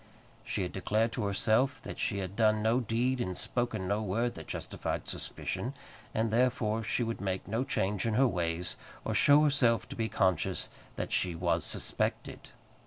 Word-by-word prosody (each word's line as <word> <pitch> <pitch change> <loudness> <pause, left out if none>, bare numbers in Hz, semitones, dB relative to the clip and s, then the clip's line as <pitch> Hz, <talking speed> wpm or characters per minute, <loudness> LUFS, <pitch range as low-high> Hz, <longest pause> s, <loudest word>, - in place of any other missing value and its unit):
She - - -2
had 90 - -3
declared 110 +4 +1
to 115 -2 -2
herself 110 +7 +2
that - - -7
she 110 -3 0
had 95 0 -4
done 110 -1 +3
no 115 +3 +3
deed 125 +2 0
and 95 -5 -3
spoken 120 -6 -1
no 100 +2 +1
word 115 +4 0
that 80 - -9
justified - - -4
suspicion, 130 +3 -3 0.4
and 110 0 0
therefore 115 -2 +2
she 120 - 0
would 115 -2 -3
make 95 -1 -2
no 110 +5 0
change 100 -5 0
in 110 - 0
her 135 +3 +5
ways, 85 -4 -2 0.3
or - - -1
show 145 +1 +6
herself 130 -6 +3
to - - -6
be 110 -1 -1
conscious 95 -4 +1 0.3
that - - -4
she 90 -2 +1
was 85 -1 +1
suspected. - - -2
110 Hz, 175 wpm, -31 LUFS, 95-120 Hz, 0.4 s, show